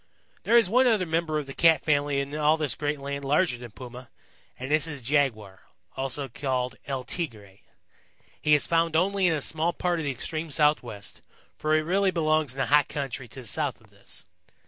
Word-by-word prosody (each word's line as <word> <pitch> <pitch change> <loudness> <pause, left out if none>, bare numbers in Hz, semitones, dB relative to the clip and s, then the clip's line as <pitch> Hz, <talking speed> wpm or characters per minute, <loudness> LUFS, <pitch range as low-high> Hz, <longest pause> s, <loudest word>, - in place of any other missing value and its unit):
"There 235 - +4
is 230 - +5
one 250 +6 +4
other 215 -6 +2
member 160 -1 -1
of 150 - -3
the 135 - -8
Cat 165 +1 +4
family 145 -2 +1
in 140 +1 -4
all 155 +1 +3
this 150 -3 0
great 145 0 -2
land 140 0 -5
larger 145 -2 +1
than 120 -1 -9
Puma, 125 +2 -11 0.5
and 130 +2 -6
this 155 0 +3
is 145 -5 -6
Jaguar, 115 -8 0 0.3
also 135 +1 -2
called 130 0 -2
El 135 -2 -3
Tigre. 110 - -5 0.8
He 150 0 +5
is 145 - +1
found 165 -1 +1
only 190 +2 +2
in 165 - +2
a 150 - -3
small 165 +2 0
part 175 -1 -1
of 155 - -3
the - - 0
extreme 155 +6 -4
Southwest, 135 -9 0 0.3
for 155 0 +1
he 155 - +2
really 190 +4 +2
belongs 155 -6 +1
in - - -14
the 135 - +1
hot 145 0 +4
country 135 -3 -4
to 130 - -10
the 120 - -9
south - - -1
of - - -23
this. - - -10
150 Hz, 205 wpm, -26 LUFS, 135-160 Hz, 0.8 s, is